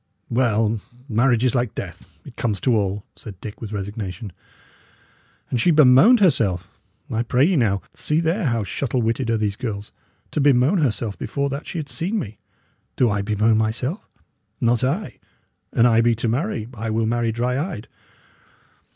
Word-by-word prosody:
"Well! 115 -3 +1 0.3
marriage 120 0 +2
is 130 - +2
like 120 -4 -1
death, - - -7 0.2
it - - -12
comes 110 -4 -1
to 125 -3 +2
all," 100 -1 -1
said 100 -5 -10
Dick, 105 +1 -9
with 110 -3 -6
resignation. 100 -1 -5 1.2
"And 120 - +1
she 175 - +3
bemoaned 155 - +6
herself? 100 - +2 0.4
I 110 - 0
pray 125 +3 +2
ye 185 +2 +2
now, 100 - +1
see 150 +1 0
there 170 +4 0
how 115 -5 +1
shuttle 120 +5 -2
witted 115 +2 -1
are 115 - +2
these 105 -2 -1
girls: 105 -4 -5 0.4
to 150 - 0
bemoan 140 +6 +4
herself 115 -7 -1
before 140 +5 -2
that 140 +2 -5
she - - -5
had 155 -3 -4
seen 190 +10 -2
me! 110 - -5 0.6
Do 120 -4 +3
I 100 -1 0
bemoan 110 +2 +2
myself? 125 - -2 0.5
Not 120 +1 +2
I. 160 +11 -2 0.5
An 115 - +3
I 115 -1 +5
be 120 0 +3
to 115 +2 -2
marry, 120 - -1
I 115 -1 -4
will 110 +1 0
marry 115 0 0
dry 125 +3 -1
eyed! 105 - -8
115 Hz, 170 wpm, -22 LUFS, 110-135 Hz, 1.2 s, bemoaned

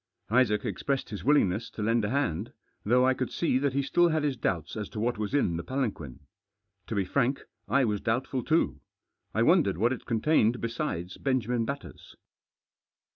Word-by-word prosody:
Isaac 115 -4 +3
expressed 135 -4 -2
his 105 - -6
willingness 115 -7 +2
to 105 - -6
lend 115 +1 +2
a 105 - 0
hand, 135 - -1 0.3
though 125 +4 +4
I 130 - +4
could 130 -1 -3
see 145 -6 +1
that 140 -1 0
he 140 +1 +1
still 175 +5 +3
had 155 -2 0
his 145 -3 0
doubts 95 - -2
as 105 -2 -4
to 110 - -6
what 115 0 -1
was 105 +5 -2
in 85 -12 +1
the 85 - -4
palanquin. 105 - -3 0.7
To 115 - -3
be 100 -2 +1
frank, 130 +6 0 0.2
I 135 -1 +3
was 105 -3 -1
doubtful 125 +2 -1
too. 155 - +1 0.5
I - - +3
wohdened - - +3
what 120 +6 +2
it 130 - -9
contained 120 0 +2
besides 115 - -3
Benjamin 125 -3 0
Batters. 140 +3 -7
120 Hz, 180 wpm, -28 LUFS, 105-135 Hz, 0.7 s, though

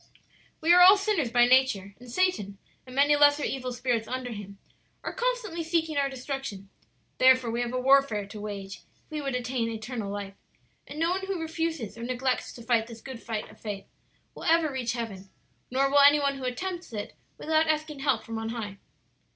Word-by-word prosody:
"We 330 +2 +5
are 360 - +7
all 380 +3 +9
sinners 395 - 0
by 240 0 +5
nature, 245 -6 +3
and 245 -1 -12
Satan, 220 - 0 0.3
and 255 - -10
many 285 +2 +5
lesser 290 0 +5
evil 255 -2 -2
spirits 245 -2 -1
under 255 -1 -4
him, 200 -2 -8 0.5
are - - -4
constantly 480 -9 -2
seeking 325 -1 0
our 280 -1 +1
destruction; 260 -7 -6 0.5
therefore 255 -2 +5
we 235 +1 -1
have 240 0 -2
a 255 - -1
warfare 265 -5 +3
to 205 +1 -9
wage 200 -2 -6 0.3
if - - -38
we 305 -1 -3
would 275 -2 -2
attain 245 -2 -1
eternal 220 -2 -5
life, 200 -1 -5 0.5
and 290 - -9
no 330 +2 +1
one 385 +1 -2
who 390 -3 -2
refuses 320 -8 -3
or - - -6
neglects 255 +1 -1
to 235 - -11
fight 230 -1 +1
this 230 -1 -10
good 255 -1 -9
fight 220 -2 -4
of - - -18
faith 205 -3 -5 0.5
will - - -9
ever 325 -2 +3
reach 250 -3 -2
heaven; 200 -5 -6 0.4
nor 270 +2 +2
will 285 +1 +4
any 285 +1 +7
one 280 -1 0
who 260 - -5
attempts 350 +7 -4
it 210 -2 -5 0.2
without 315 +1 +1
asking 305 -2 -1
help 270 -6 +1
from 225 0 -5
on 225 0 -4
high. 210 -4 -5
255 Hz, 200 wpm, -27 LUFS, 225-300 Hz, 0.5 s, all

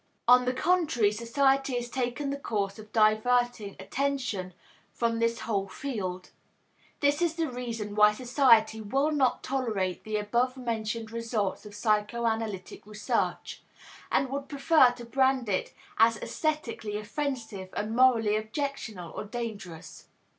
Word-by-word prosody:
On 250 +1 +7
the 250 - +1
contrary, 305 - +2
society 270 +4 +1
has 240 0 -2
taken 260 +3 -2
the 280 - -4
course 200 -5 -2
of 215 0 -12
diverting 220 0 +2
attention 225 -5 -2 0.4
from 230 -1 -1
this 230 +1 0
whole 200 -3 -1
field. 190 -9 -5 0.7
This 290 +2 +2
is 335 -2 +1
the 330 -1 0
reason 230 -4 -5
why 210 0 +6
society 235 -3 +3
will 270 +8 +1
not 275 -4 +1
tolerate 215 -9 -2
the 215 -1 -2
above 240 +5 0
mentioned 225 -2 -3
results 225 -3 -2
of 205 - -11
psychoanalytic 215 -2 -1
research, 210 0 -2 0.5
and 270 - +2
would 280 0 -4
prefer 280 -1 +5
to 245 -1 -10
brand 260 0 +2
it 190 -2 -1 0.3
as 225 0 +5
aesthetically 240 -10 -3
offensive 220 -4 -4
and 210 +2 -2
morally 235 -4 +4
objectionable 220 - -4
or - - -4
dangerous. 200 -7 -7
230 Hz, 130 wpm, -28 LUFS, 210-260 Hz, 0.7 s, On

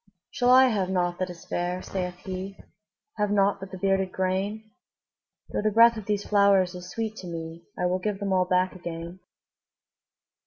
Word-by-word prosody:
``Shall 245 - +2
I 260 +1 +7
have 200 -5 0
nought 175 -2 0
that 185 0 -1
is 175 -1 -10
fair?'' 180 +1 -2
saith 180 -2 -4
he; 190 +1 -5 0.6
``Have 210 0 +1
nought 200 0 +2
but 195 0 -8
the 190 - -8
bearded 190 0 +1
grain? 200 +4 -2 0.8
Though - - -2
the 215 - +2
breath 230 +2 +6
of 215 -3 -8
these 205 -1 -1
flowers 200 -3 +4
is 180 0 -9
sweet 220 0 -3
to 180 - -8
me, 165 0 -7
I 180 - 0
will 180 +1 +1
give 205 +1 -2
them 195 -1 -1
all 185 -1 +3
back 185 0 +1
again.'' 170 0 -7
190 Hz, 185 wpm, -26 LUFS, 180-205 Hz, 0.8 s, I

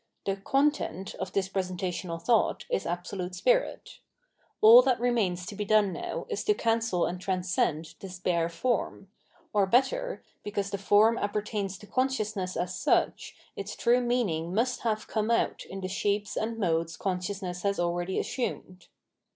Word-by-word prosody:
The 195 0 -1
content 270 - 0
of 190 -1 -4
this 195 -1 0
presentational 180 -2 -3
thought 230 +7 +2
is - - 0
Absolute 180 +1 -4
Spirit. - - 0 0.6
All 230 +3 +10
that 255 -2 +1
remains 210 -8 0
to 210 - -7
be 210 - -2
done 205 -2 +3
now - - -4
is 435 -4 -3
to 420 - +3
cancel 225 - +1
and 180 +1 -4
trans 185 -1 -2
cend 155 -1 0
this 185 -2 -8
bare 170 -2 0
form; 195 +1 -2 0.4
or 200 -2 +3
better, - - +1 0.2
because 200 -1 -3
the 200 - -3
form 210 +4 +4
appertains 205 -1 -2
to 210 - -13
consciousness 215 -7 -1
as 180 +1 -2
such - - +1 0.2
its 200 +2 -5
true 245 +1 +3
meaning 195 -9 0
must 245 +3 +1
have 215 -2 -1
come 215 0 -1
out 230 - +1
in 195 0 -7
the 185 - -3
shapes 205 +2 -1
and 225 +1 -2
modes 165 -5 0
conscious 190 +1 -3
ness 180 -1 -4
has 200 +1 0
already 175 +1 -1
assumed. 185 -7 -4
200 Hz, 160 wpm, -28 LUFS, 180-230 Hz, 0.6 s, All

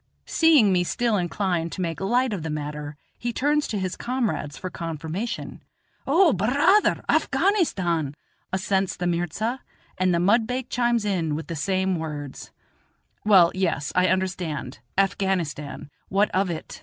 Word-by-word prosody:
Seeing 300 -12 +5
me 180 -1 +3
still 235 +5 0
inclined 175 -2 -1
to 190 - -4
make 165 -2 -3
light 240 +4 +1
of 190 - -3
the 160 - -4
matter, 150 0 -5 0.2
he 240 - -2
turns 290 +5 +1
to 210 - -2
his 185 -2 -2
comrades 235 - -2
for 185 - -6
confirmation. 165 +7 -5 0.5
"O, 325 +2 +5
bur 195 +2 0
raa 305 - +5
ther, - - 0
Afghanistan," 180 - +1 0.4
assents 190 0 0
the 180 - -3
mirza; 175 - -1 0.4
and 185 0 +3
the 170 - +2
mudbake 230 +7 +1
chimes 240 -3 +1
in 170 -7 0
with 160 - -5
the 165 - -3
same 190 +3 0
words. 150 -4 -6 0.8
"Well, 185 -5 +6
yes, 175 -6 -1
I 180 0 +3
understand; 180 -9 -2 0.2
Afghanistan 185 -8 -1 0.2
what 200 +2 +2
of 190 0 +1
it?" 165 -2 -6
185 Hz, 150 wpm, -24 LUFS, 165-225 Hz, 0.8 s, Well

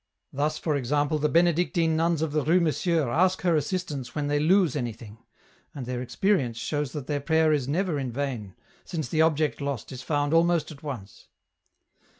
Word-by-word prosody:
Thus, 150 +3 0
for 155 -3 -1
example, 145 +3 0
the 150 +1 +1
Benedictine 170 0 +2
nuns 165 0 +1
of 160 - -2
the 150 -1 0
Rue 170 +5 +4
Monsieur 165 -2 +1
ask 185 +5 +2
her 175 -2 +3
assistance 150 -5 -3
when 145 -1 -1
they 145 0 +2
lose 170 -1 +3
anything, 115 -4 -5 0.6
and 135 -3 -5
their 125 0 -3
experience 130 - 0
shows 145 +3 -2
that 145 -4 -5
their 145 0 -2
prayer 160 +1 +3
is 140 -4 0
never 165 +1 0
in 130 -3 -3
vain, 120 -7 -4 0.3
since 155 -8 -4
the 155 - +2
object 155 -2 +1
lost 140 -5 -4
is 130 -1 -7
found 145 +1 0
almost 170 0 +3
at 140 - -12
once. 125 -10 -8
150 Hz, 180 wpm, -26 LUFS, 135-165 Hz, 0.6 s, Rue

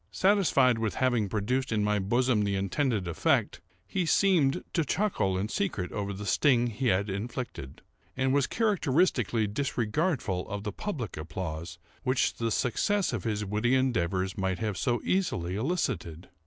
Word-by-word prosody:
Satisfied 185 - +3
with 110 -2 -1
having 120 -6 +1
produced 125 +7 -1
in 105 -2 +1
my 105 0 +1
bosom 120 +3 +2
the 100 -1 0
intended 100 +1 0
effect, 85 - +1 0.2
he 180 - -1
seemed 175 -3 +3
to 165 - +2
chuckle 150 - 0
in 100 +3 -1
secret 110 - -2
over 100 -1 -3
the 100 +1 -6
sting 120 +4 +3
he 120 +2 -2
had 100 0 +2
inflicted, 105 - -5 0.3
and 130 0 +1
was 140 -1 +2
characteristically 155 - +1
disregardful 120 - -1
of 100 0 -4
the 105 - -3
public 130 - -5
applause 80 +1 -5 0.2
which 130 -1 +1
the 115 -1 -1
success 185 - 0
of 110 - -3
his 105 -2 -1
witty 110 +6 +1
endeavours 95 -7 0
might 95 -1 0
have 110 -3 -2
so 120 +4 0
easily 95 - 0
elicited. 95 - -2
115 Hz, 155 wpm, -28 LUFS, 100-135 Hz, 0.3 s, Satisfied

